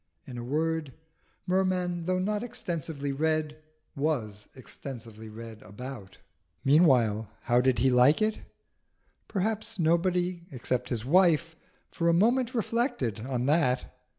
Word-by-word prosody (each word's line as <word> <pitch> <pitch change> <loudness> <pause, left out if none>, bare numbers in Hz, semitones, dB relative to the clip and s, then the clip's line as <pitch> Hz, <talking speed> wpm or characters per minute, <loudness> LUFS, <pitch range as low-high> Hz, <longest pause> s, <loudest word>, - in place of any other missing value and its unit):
In 125 - -9
a 120 - -5
word, 155 +2 -1 0.5
Merman, 180 -2 0
though 185 0 +1
not 205 +3 -1
extensively 165 - -4
read, 155 +1 -1 0.3
was 120 -9 -2
extensively 115 -2 -9
read 110 0 -10
about. 105 0 -9 0.5
Meanwhile, 125 - +4
how 120 -1 +3
did 130 -1 +2
he 130 +3 +3
like 125 +4 +5
it? 215 0 0 0.9
Perhaps 220 +2 -2
nobody, 175 +1 +1
except 125 -1 -2
his 120 -3 -3
wife, 165 +1 +3 0.4
for 170 0 0
a - - +4
moment 240 +7 +2
reflected 230 - -1
on 125 -2 -1
that. 135 -4 +2
150 Hz, 125 wpm, -28 LUFS, 125-180 Hz, 0.9 s, like